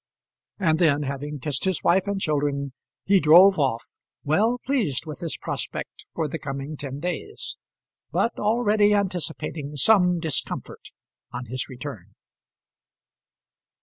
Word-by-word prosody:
And 160 -5 +2
then, 150 -4 +3
having 145 +2 -4
kissed 140 +2 -1
his 190 -3 0
wife 185 +3 +3
and 200 -1 -1
children, 140 -4 -1 0.3
he 195 0 +5
drove 175 +4 +7
off, 130 -5 +1 0.4
well 215 +11 +2
pleased 225 - 0
with 155 -1 -7
his 165 -2 -4
prospect - - -5
for 160 -2 0
the 160 +3 -5
coming 140 +1 -5
ten 140 -1 -6
days, 180 - -5 0.6
but 230 - 0
already 210 -1 +3
anticipating 165 -6 -3
some 180 +2 +4
discomfort 160 -4 -3 0.4
on 125 - -5
his 130 +2 -4
return. 125 - -8
155 Hz, 125 wpm, -24 LUFS, 140-190 Hz, 0.6 s, drove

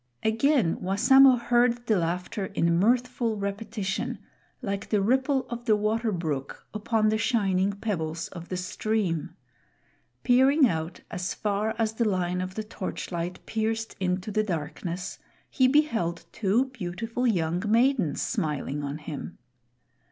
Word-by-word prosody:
Again 225 - +2
Wassamo 260 +8 +6
heard 240 0 +2
the 220 - +3
laughter 180 +3 -2
in 170 0 +2
mirthful 240 +1 +1
repetition, 200 0 -3 0.4
like 200 0 -4
the 210 - +2
ripple 265 +6 +2
of 240 0 -6
the 220 -3 +4
water 215 +2 0
brook 155 -7 -4
upon 215 0 +1
the 215 0 +1
shining 200 -4 +1
pebbles 170 -6 -3
of 170 -2 -9
the 185 - -2
stream. 185 -2 -2 0.9
Peering 265 +3 +5
out 160 -2 -3
as 180 +1 -3
far 210 +1 -1
as 220 -1 0
the 225 -1 +1
line 180 -1 0
of 185 0 -5
the 215 - -3
torchlight 180 -4 -5
pierced 225 0 -2
into 185 +2 -1
the 215 - +2
darkness, 175 0 -4 0.3
he 260 -2 +4
beheld 235 - +1
two 220 +5 +2
beautiful 225 +2 -3
young 175 -5 +1
maidens 230 - +2
smiling 150 - -2
on 140 +1 -3
him. 150 -1 -7
210 Hz, 135 wpm, -27 LUFS, 180-230 Hz, 0.9 s, Wassamo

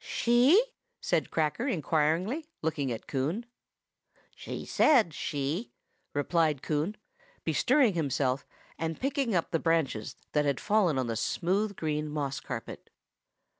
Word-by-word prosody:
"She?" 245 - +4 0.4
said - - 0
Cracker 160 - 0
inquiringly, 175 - 0 0.2
looking 145 -4 -1
at 115 - -5
Coon. 155 - -2 0.9
"She - - -6
said 235 - +4
'she'!" 145 - -3 0.4
replied 150 -1 +1
Coon, 155 +7 -1 0.5
bestirring 260 -9 +3
himself, 140 -4 0 0.4
and 165 -1 -3
picking 270 -5 0
up 170 - 0
the 165 - +1
dead - - -14
branches 160 -10 0 0.2
that 150 - +2
had 140 -2 +1
fallen 205 -9 +2
on 130 - +1
the 115 -1 -2
smooth 195 - 0
green 150 -2 -2
moss 145 -2 -2
carpet. - - -7
160 Hz, 130 wpm, -29 LUFS, 145-215 Hz, 0.9 s, She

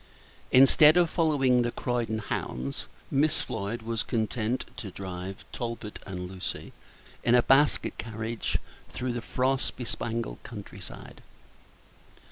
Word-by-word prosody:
Instead 150 +5 +8
of 175 -2 +4
following 135 -7 +3
the 120 - +1
Croydon 120 -3 -1
hounds, 70 - -3 0.2
Miss 145 +2 +3
Floyd 110 +4 -3
was 115 -1 -1
content 115 +1 -1
to 115 -6 -5
drive 95 0 -6
Talbot 115 -3 -5
and 90 -2 -4
Lucy 95 0 -5 0.5
in 120 - +5
a 120 - +6
basket 145 +3 +3
carriage 115 0 -2 0.3
through 125 -1 -3
the 120 - -3
frost 130 +3 0
bespangled 115 - -3
country - - -9
side. - - -10
115 Hz, 120 wpm, -28 LUFS, 105-130 Hz, 0.5 s, Instead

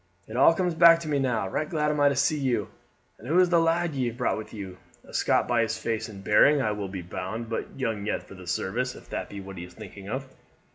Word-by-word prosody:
"It 110 - -8
all 135 +6 +6
comes 180 -1 0
back 165 0 +7
to 165 - -6
me 145 -2 +1
now. 125 -7 0
Right 150 +11 -2
glad 150 -2 +1
am 150 - -2
I 145 0 +5
to 140 - -1
see 145 +3 +2
you. 130 -3 0 0.5
And 115 - -11
who 160 +5 +2
is 180 -1 +5
the 170 -1 +4
lad 165 0 +1
ye 130 -3 0
have 120 0 -5
brought 125 - +1
with 110 - -9
you? 95 -4 -8 0.2
A - - -16
Scot - - +2
by 120 -1 +2
his 110 -1 -1
face 110 0 -3
and 100 -2 -10
bearing, 140 +9 +5
I 110 -5 +1
will 105 -1 -3
be 95 -2 -6
bound, 110 +6 -5
but 115 - -4
young 110 -5 -2
yet - - -1
for - - -12
the 95 -2 -12
service 120 +9 -2
if - - -14
that - - -4
be 100 - -7
what 95 -1 -9
he - - -6
is 90 -1 -16
thinking 100 -2 -10
of." 135 +4 -4
120 Hz, 275 wpm, -27 LUFS, 100-150 Hz, 0.5 s, back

